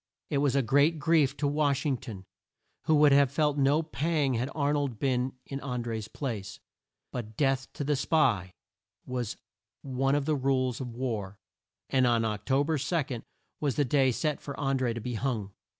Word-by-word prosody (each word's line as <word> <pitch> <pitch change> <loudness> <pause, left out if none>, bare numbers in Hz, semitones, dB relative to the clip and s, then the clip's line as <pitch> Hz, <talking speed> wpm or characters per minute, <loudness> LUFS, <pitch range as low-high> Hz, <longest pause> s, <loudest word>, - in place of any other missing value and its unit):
It 140 - +2
was 140 -2 +2
a 135 - +3
great 145 +7 +3
grief 150 -3 +2
to 145 - 0
Wash 145 -1 +1
ing 140 -4 +1
ton, 110 -7 -9 0.6
who 155 - +4
would 150 -1 +6
have 140 -1 +5
felt 150 -1 +1
no 140 +4 +3
pang 155 -3 0
had 125 +3 -1
Ar 145 -1 +1
nold 140 -6 -1
been 130 +1 0
in 135 - -5
An 125 -3 -3
dré's 110 -2 -4
place. 105 -8 -5 0.5
But 110 -3 -6
death 135 -2 +1
to - - -4
the 145 +1 +1
spy! 120 - +1 0.5
was 125 -3 -3 0.5
one 135 +1 +1
of 145 -1 0
the 155 0 +1
rules 130 -2 0
of 120 -3 -6
war, 110 -6 -3 0.5
and 130 -2 +3
Oc 115 -3 0
to 135 +1 +3
ber 155 0 0
2 140 -4 -1 0.4
was 145 -4 0
the 145 - +2
day 135 +1 +3
set 150 +4 -1
for 140 - -7
An 135 -2 +1
dré 120 -3 0
to 115 - -4
be 125 +3 -4
hung. 110 -4 -2
135 Hz, 190 wpm, -29 LUFS, 120-145 Hz, 0.6 s, would